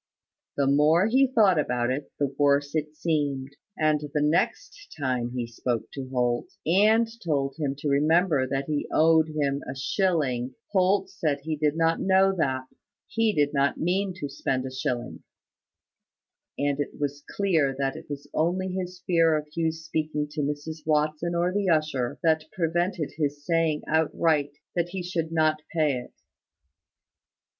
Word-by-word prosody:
The 140 Hz, -, +2 dB
more 150 Hz, +6 st, +4 dB
he 260 Hz, +5 st, +4 dB
thought 210 Hz, -9 st, +4 dB
about 125 Hz, -3 st, 0 dB
it, 140 Hz, +2 st, -4 dB
the 140 Hz, -2 st, -1 dB
worse 145 Hz, 0 st, +3 dB
it 155 Hz, -1 st, -2 dB
seemed; 140 Hz, -4 st, -1 dB, 0.2 s
and 155 Hz, -1 st, +2 dB
the 150 Hz, 0 st, -3 dB
next 170 Hz, -, -1 dB
time 125 Hz, -3 st, -1 dB
he 120 Hz, -2 st, -1 dB
spoke 115 Hz, 0 st, -3 dB
to 135 Hz, -2 st, -6 dB
Holt, 125 Hz, -2 st, 0 dB, 0.2 s
and 215 Hz, +7 st, +4 dB, 0.2 s
told 140 Hz, -5 st, 0 dB
him 140 Hz, -3 st, -1 dB
to 145 Hz, -, -4 dB
remember 150 Hz, 0 st, +3 dB
that 135 Hz, +1 st, -2 dB
he 150 Hz, -1 st, -2 dB
owed 160 Hz, 0 st, +4 dB
him 145 Hz, -2 st, -1 dB
a 130 Hz, -, -4 dB
shilling, 130 Hz, -4 st, 0 dB, 0.2 s
Holt 190 Hz, 0 st, +2 dB
said 155 Hz, -7 st, -1 dB
he 155 Hz, +2 st, -2 dB
did 150 Hz, +1 st, 0 dB
not 165 Hz, 0 st, +2 dB
know 190 Hz, 0 st, +4 dB
that, 130 Hz, -6 st, 0 dB, 0.4 s
he 225 Hz, -1 st, +1 dB
did 145 Hz, -5 st, +1 dB
not 140 Hz, 0 st, +1 dB
mean 185 Hz, +3 st, 0 dB
to 175 Hz, -6 st, -4 dB
spend 130 Hz, -1 st, -2 dB
a 130 Hz, -, -5 dB
shilling; 125 Hz, -1 st, -3 dB, 1.4 s
and 145 Hz, 0 st, 0 dB
it 145 Hz, -, -4 dB
was 145 Hz, 0 st, -3 dB
clear 160 Hz, -9 st, +2 dB
that 135 Hz, -1 st, -1 dB
it -, -, -10 dB
was 145 Hz, -1 st, -6 dB
only 180 Hz, +4 st, 0 dB
his 180 Hz, -1 st, -5 dB
fear 165 Hz, -3 st, +4 dB
of 150 Hz, -, -4 dB
Hugh's 160 Hz, -1 st, -1 dB
speaking 155 Hz, -2 st, -2 dB
to 150 Hz, 0 st, -3 dB
Mrs 145 Hz, +2 st, -3 dB
Watson 155 Hz, +2 st, 0 dB
or 175 Hz, +1 st, +1 dB
the 200 Hz, -1 st, 0 dB
usher, 155 Hz, -6 st, 0 dB
that 160 Hz, -1 st, +2 dB
prevented 175 Hz, -1 st, -1 dB
his 145 Hz, -2 st, -2 dB
saying 165 Hz, -3 st, +1 dB
outright 160 Hz, -2 st, +1 dB, 0.2 s
that 175 Hz, -1 st, 0 dB
he 185 Hz, 0 st, -4 dB
should 165 Hz, -2 st, -3 dB
not 155 Hz, -1 st, +2 dB
pay 155 Hz, -4 st, +2 dB
it. 125 Hz, -, -12 dB
155 Hz, 160 wpm, -26 LUFS, 140-170 Hz, 1.4 s, more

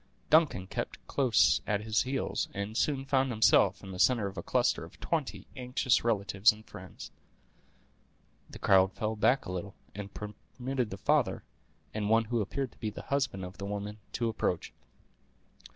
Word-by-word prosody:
Duncan 155 Hz, -, +4 dB
kept 95 Hz, -, -5 dB
close 130 Hz, -5 st, +3 dB
at 105 Hz, -1 st, +1 dB
his 110 Hz, 0 st, +2 dB
heels, 135 Hz, +1 st, -1 dB
and 100 Hz, +2 st, -4 dB
soon 135 Hz, +1 st, 0 dB
found 135 Hz, -1 st, +2 dB
himself 105 Hz, -4 st, +4 dB
in 95 Hz, -, -8 dB
the 90 Hz, -, -7 dB
center 120 Hz, -2 st, +4 dB
of 100 Hz, 0 st, -5 dB
a -, -, -4 dB
cluster -, -, +1 dB
of -, -, -13 dB
twenty -, -, -2 dB
anxious 125 Hz, 0 st, +1 dB
relatives 100 Hz, -2 st, +3 dB
and 110 Hz, 0 st, -13 dB
friends. -, -, -10 dB, 1.4 s
The -, -, -10 dB
crowd 95 Hz, -1 st, +4 dB
fell 110 Hz, 0 st, -2 dB
back 125 Hz, +5 st, +2 dB
a -, -, -5 dB
little, 95 Hz, +2 st, -5 dB, 0.2 s
and 100 Hz, 0 st, -7 dB
permitted 125 Hz, +4 st, -4 dB
the 95 Hz, -, -6 dB
father, -, -, +1 dB, 0.5 s
and 105 Hz, -1 st, -2 dB
one 115 Hz, +1 st, +4 dB
who 115 Hz, 0 st, 0 dB
appeared 130 Hz, +6 st, -3 dB
to -, -, -24 dB
be 110 Hz, -, -2 dB
the 105 Hz, -, -8 dB
husband 130 Hz, -10 st, 0 dB
of 90 Hz, +3 st, -11 dB
the 100 Hz, -, -4 dB
woman, 105 Hz, +1 st, -5 dB
to 120 Hz, -, 0 dB
approach. 110 Hz, -6 st, -2 dB
110 Hz, 170 wpm, -30 LUFS, 100-125 Hz, 1.4 s, Duncan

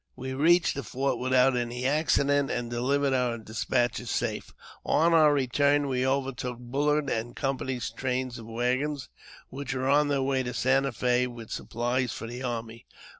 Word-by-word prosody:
We 130 Hz, +1 st, -5 dB
reached 165 Hz, +5 st, +4 dB
the 140 Hz, -, -4 dB
fort 135 Hz, +1 st, -2 dB
without 130 Hz, 0 st, +3 dB
any 120 Hz, +1 st, -2 dB
accident, 145 Hz, -1 st, +2 dB
and 120 Hz, -1 st, -3 dB
delivered 135 Hz, +3 st, +1 dB
our 125 Hz, -2 st, +1 dB
despatches 120 Hz, +1 st, -1 dB
safe. -, -, -2 dB, 0.3 s
On 165 Hz, +2 st, +3 dB
our 155 Hz, -2 st, +6 dB
return 145 Hz, +1 st, +2 dB
we 130 Hz, -1 st, 0 dB
overtook 130 Hz, -2 st, -2 dB
BuUard 145 Hz, +4 st, 0 dB
and 115 Hz, +1 st, -3 dB
Company's 130 Hz, -4 st, -2 dB
trains 125 Hz, 0 st, -3 dB
of 115 Hz, -, -10 dB
waggons, 125 Hz, -, -1 dB, 0.4 s
which 135 Hz, 0 st, -5 dB
were 130 Hz, 0 st, -1 dB
on 145 Hz, +2 st, +4 dB
their 140 Hz, -2 st, +1 dB
way 135 Hz, -1 st, +1 dB
to 125 Hz, -1 st, -4 dB
Santa 135 Hz, +2 st, +2 dB
Fe 125 Hz, +2 st, +1 dB
with 120 Hz, -3 st, -10 dB
supplies 120 Hz, +1 st, -1 dB
for -, -, -6 dB
the 120 Hz, +2 st, -7 dB
army. 115 Hz, -2 st, -5 dB
130 Hz, 165 wpm, -27 LUFS, 120-140 Hz, 0.4 s, our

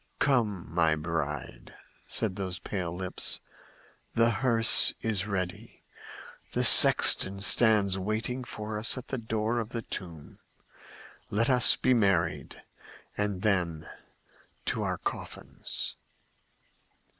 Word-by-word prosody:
"Come, 110 Hz, -10 st, 0 dB
my 80 Hz, -2 st, +2 dB
bride!" 75 Hz, -6 st, -5 dB, 0.3 s
said 100 Hz, -4 st, -1 dB
those 95 Hz, -2 st, -5 dB
pale 90 Hz, -1 st, -5 dB
lips. 90 Hz, +1 st, -3 dB, 0.8 s
"The 115 Hz, 0 st, +3 dB
hearse 115 Hz, -2 st, +3 dB
is 105 Hz, -3 st, -1 dB
ready; 95 Hz, +2 st, -5 dB, 0.7 s
the -, -, 0 dB
sexton 100 Hz, +1 st, +6 dB
stands 100 Hz, 0 st, +4 dB
waiting 110 Hz, +6 st, -3 dB
for 105 Hz, -2 st, -6 dB
us 115 Hz, +4 st, -1 dB
at 125 Hz, -, -9 dB
the 130 Hz, -, -3 dB
door 110 Hz, +1 st, -2 dB
of 115 Hz, -1 st, -5 dB
the 115 Hz, -1 st, -5 dB
tomb. 85 Hz, -8 st, -9 dB, 0.9 s
Let 115 Hz, +5 st, +1 dB
us 125 Hz, -2 st, +6 dB
be 130 Hz, -, +1 dB
married, 95 Hz, -8 st, 0 dB, 0.5 s
and 105 Hz, -2 st, -3 dB
then 85 Hz, -7 st, 0 dB, 0.8 s
to -, -, -2 dB
our -, -, -2 dB
coffins!" -, -, -6 dB
100 Hz, 110 wpm, -28 LUFS, 90-115 Hz, 0.9 s, sexton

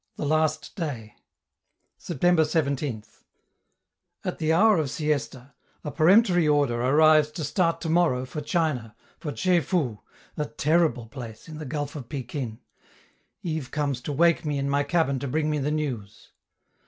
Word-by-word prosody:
THE -, -, -4 dB
LAST 155 Hz, +1 st, 0 dB
DAY 130 Hz, -, -5 dB, 0.8 s
September 175 Hz, +1 st, +1 dB
17th 140 Hz, -7 st, -2 dB, 1.0 s
At -, -, -3 dB
the 160 Hz, 0 st, +1 dB
hour 200 Hz, +3 st, +5 dB
of 150 Hz, -3 st, -1 dB
siesta, 140 Hz, -3 st, -3 dB, 0.3 s
a 150 Hz, -, -4 dB
peremptory 175 Hz, +1 st, +4 dB
order 140 Hz, -5 st, +2 dB
arrives 155 Hz, +3 st, +5 dB
to 155 Hz, -, -4 dB
start 165 Hz, +1 st, +1 dB
tomorrow 160 Hz, -6 st, +1 dB
for 150 Hz, +4 st, -6 dB
China, 150 Hz, -9 st, -1 dB, 0.2 s
for 150 Hz, -, -4 dB
Tche 180 Hz, +2 st, +2 dB
fou 145 Hz, -, -1 dB, 0.4 s
(a 150 Hz, -, -1 dB
terrible 150 Hz, -4 st, +1 dB
place, 115 Hz, -2 st, -9 dB
in 155 Hz, -1 st, -8 dB
the 155 Hz, -, -6 dB
gulf 145 Hz, +2 st, -4 dB
of 130 Hz, -6 st, -8 dB
Pekin). 125 Hz, -3 st, -5 dB, 0.8 s
Yves 155 Hz, -6 st, -3 dB
comes 140 Hz, -3 st, -2 dB
to 145 Hz, -, -4 dB
wake 170 Hz, +4 st, +3 dB
me 150 Hz, -2 st, -1 dB
in 140 Hz, 0 st, -1 dB
my 140 Hz, +1 st, +2 dB
cabin 145 Hz, -2 st, +1 dB
to 140 Hz, -, -4 dB
bring 155 Hz, +3 st, 0 dB
me 150 Hz, -, 0 dB
the 140 Hz, +1 st, -1 dB
news. 135 Hz, -10 st, -4 dB
150 Hz, 155 wpm, -26 LUFS, 130-160 Hz, 1.0 s, hour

